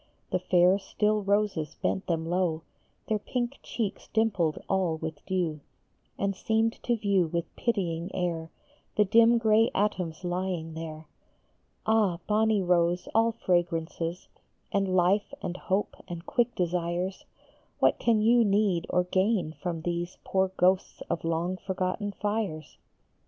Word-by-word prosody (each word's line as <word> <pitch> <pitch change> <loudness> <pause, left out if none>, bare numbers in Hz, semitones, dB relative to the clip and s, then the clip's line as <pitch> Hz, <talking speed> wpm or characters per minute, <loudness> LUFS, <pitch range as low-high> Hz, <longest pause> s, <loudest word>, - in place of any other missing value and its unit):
The 185 - +1
fair, 180 +1 +4
still 210 +2 0
roses 200 -6 0
bent 190 - -1
them 165 -2 0
low, 170 -2 0 0.4
Their 215 -1 +1
pink 245 +4 -3
cheeks 215 -4 -4
dimpled 195 -8 +1
all 185 -4 +1
with 160 -2 -6
dew, 175 -5 -1 0.6
And 200 0 -1
seemed 225 +3 0
to 240 -1 0
view 200 -5 +2
with 170 +1 -4
pitying 175 -7 -1
air 170 -3 -2 0.5
The 210 - +5
dim 230 +3 +6
gray 225 0 +4
atoms 185 -4 -1
lying 175 -2 -2
there. 160 -1 -7 0.8
Ah, 215 -5 +3
bonny 215 -1 +2
rose, 175 0 +2
all 225 +1 +3
fragrances, 175 -3 -1 0.4
And 195 -2 +1
life 195 +8 +2
and 175 - -3
hope 190 +2 -1
and 175 -1 -7
quick 240 0 +1
desires, 175 +1 -1 0.5
What - - +3
can 225 -2 +3
you 235 +2 +5
need 200 -4 +2
or 180 - +2
gain 185 -2 +1
from 165 -2 -4
these 175 0 -3
Poor 190 0 +1
ghosts 185 +1 +2
of - - -2
long 165 +3 -1
forgotten 190 +2 -2
fires? 205 -7 -3
185 Hz, 135 wpm, -28 LUFS, 170-210 Hz, 0.8 s, dim